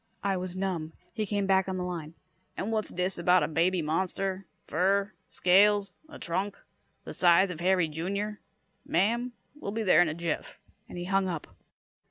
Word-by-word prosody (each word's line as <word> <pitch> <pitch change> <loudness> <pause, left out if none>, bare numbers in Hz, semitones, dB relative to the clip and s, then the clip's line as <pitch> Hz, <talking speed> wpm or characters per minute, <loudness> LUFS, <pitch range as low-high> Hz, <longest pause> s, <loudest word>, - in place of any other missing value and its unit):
I 195 -1 +1
was 185 0 -4
numb. 180 -5 -2 0.2
He 215 -3 -2
came 205 0 0
back 190 0 +3
on 190 - -2
the 180 - -2
line. 165 -3 -5 0.4
"And 210 - -2
what's 215 -1 -1
dis 180 +1 -2
about 180 +1 +4
a - - +1
baby 170 +2 +1
monster? 185 +3 -2 0.2
Fur? 195 +5 +1 0.2
Scales? 200 +1 +4 0.2
A 310 - -10
trunk? 190 +4 -2 0.5
The - - -7
size 180 +1 +4
of 165 - -7
Harry, 180 -1 +3
Jr.? 200 +7 -3 0.4
Ma'am, 235 +8 +1 0.2
we'll 295 -8 -7
be 225 +1 -2
there 185 -3 +6
in 175 - +3
a 155 - -4
jiff," 170 -2 -3 0.3
and - - -8
he 175 - -4
hung 195 0 +1
up. 170 -4 -5
185 Hz, 180 wpm, -29 LUFS, 175-200 Hz, 0.5 s, there